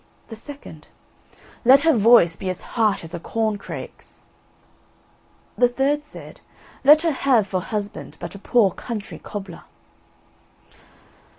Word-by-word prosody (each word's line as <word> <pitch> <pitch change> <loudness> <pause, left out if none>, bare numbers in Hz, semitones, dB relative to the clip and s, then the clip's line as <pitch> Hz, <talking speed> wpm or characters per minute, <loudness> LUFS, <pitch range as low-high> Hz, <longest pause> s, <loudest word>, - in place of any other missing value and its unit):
The 225 - -8
second: 285 +6 -12 0.8
"Let 265 +3 +7
her 325 +1 +4
voice 215 -6 +5
be 190 +2 -5
as 185 - -5
harsh 215 -6 +1
as 165 +1 -8
a 170 - -4
corn 220 +3 -2
crake's." - - -9 1.3
The 245 - +4
third 275 +4 0
said: 295 - -13 0.4
"Let 300 +3 +7
her 330 - +2
have 260 -6 +2
for 190 -2 -2
husband 205 +1 -5
but - - -7
a 200 - -10
poor 205 -1 +2
country 220 +2 -7
cobbler." 195 -4 -8
225 Hz, 130 wpm, -22 LUFS, 200-270 Hz, 1.3 s, Let